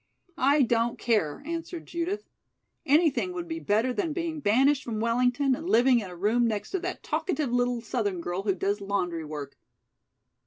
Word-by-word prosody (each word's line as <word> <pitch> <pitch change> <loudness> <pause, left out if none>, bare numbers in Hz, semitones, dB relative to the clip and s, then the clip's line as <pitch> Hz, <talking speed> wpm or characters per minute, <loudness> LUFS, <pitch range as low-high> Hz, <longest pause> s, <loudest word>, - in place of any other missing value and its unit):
"I 285 +1 +5
don't 235 0 +1
care," 215 - 0
answered 335 +1 -5
Judith. 365 +5 -3 0.6
"Anything 315 +4 +3
would 345 -1 -5
be 325 0 -4
better 225 +1 +1
than 270 +8 -1
being 330 -2 -3
banished 270 +4 +3
from 220 -3 -4
Wellington 245 +4 +2
and 320 +7 -4
living 245 -2 +5
in 200 -4 -6
a 180 - -9
room 220 +6 +2
next 215 -3 -3
to 380 - 0
that 365 +1 -5
talkative 305 -9 -1
little 245 -1 +1
southern 210 -5 -2
girl 175 +2 -3
who 195 -2 0
does 200 +2 -1
laundry 180 -4 -2
work." 150 -2 -7
245 Hz, 170 wpm, -27 LUFS, 205-310 Hz, 0.6 s, I